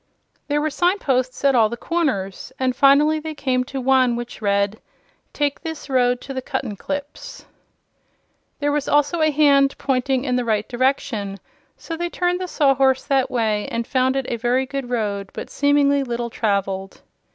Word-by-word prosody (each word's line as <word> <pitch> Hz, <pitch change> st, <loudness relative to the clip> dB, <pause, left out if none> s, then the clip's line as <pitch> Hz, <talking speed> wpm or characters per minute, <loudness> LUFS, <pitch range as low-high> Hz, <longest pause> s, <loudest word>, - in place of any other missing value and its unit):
There 295 Hz, 0 st, +1 dB
were 310 Hz, 0 st, -1 dB
signposts 275 Hz, -8 st, 0 dB
at 275 Hz, -, +5 dB
all 225 Hz, -4 st, +4 dB
the 235 Hz, -, -5 dB
corners, 260 Hz, -, -2 dB
and 255 Hz, -1 st, 0 dB
finally 290 Hz, +3 st, +4 dB
they 310 Hz, 0 st, -6 dB
came 255 Hz, -3 st, 0 dB
to 270 Hz, +1 st, -5 dB
one 260 Hz, -2 st, +3 dB
which 240 Hz, 0 st, -7 dB
read: 200 Hz, 0 st, 0 dB, 0.5 s
TAKE 290 Hz, -1 st, -1 dB
THIS 320 Hz, -4 st, -7 dB
ROAD 250 Hz, -1 st, +2 dB
TO 275 Hz, -, -7 dB
THE 260 Hz, -, -3 dB
CUTTENCLIPS 285 Hz, -, -5 dB, 1.1 s
There 290 Hz, 0 st, 0 dB
was 290 Hz, -1 st, -1 dB
also 295 Hz, +3 st, +2 dB
a 310 Hz, -, +4 dB
hand 280 Hz, -2 st, +3 dB
pointing 260 Hz, -1 st, 0 dB
in 250 Hz, -2 st, 0 dB
the 250 Hz, -, 0 dB
right 215 Hz, -2 st, 0 dB
direction, 240 Hz, -6 st, -1 dB, 0.4 s
so 330 Hz, -, -6 dB
they 345 Hz, +1 st, -3 dB
turned 355 Hz, +1 st, -1 dB
the 365 Hz, -, -3 dB
Sawhorse 270 Hz, -5 st, +2 dB
that 270 Hz, -2 st, +1 dB
way 220 Hz, -4 st, 0 dB
and 230 Hz, 0 st, -3 dB
found 260 Hz, +1 st, +1 dB
it 270 Hz, -1 st, -1 dB
a 235 Hz, -, -2 dB
very 245 Hz, +3 st, +1 dB
good 270 Hz, -1 st, -5 dB
road, 205 Hz, -5 st, -2 dB
but -, -, -7 dB
seemingly 285 Hz, -1 st, +3 dB
little 235 Hz, -2 st, -4 dB
traveled. 195 Hz, -3 st, -2 dB
265 Hz, 170 wpm, -21 LUFS, 235-290 Hz, 1.1 s, at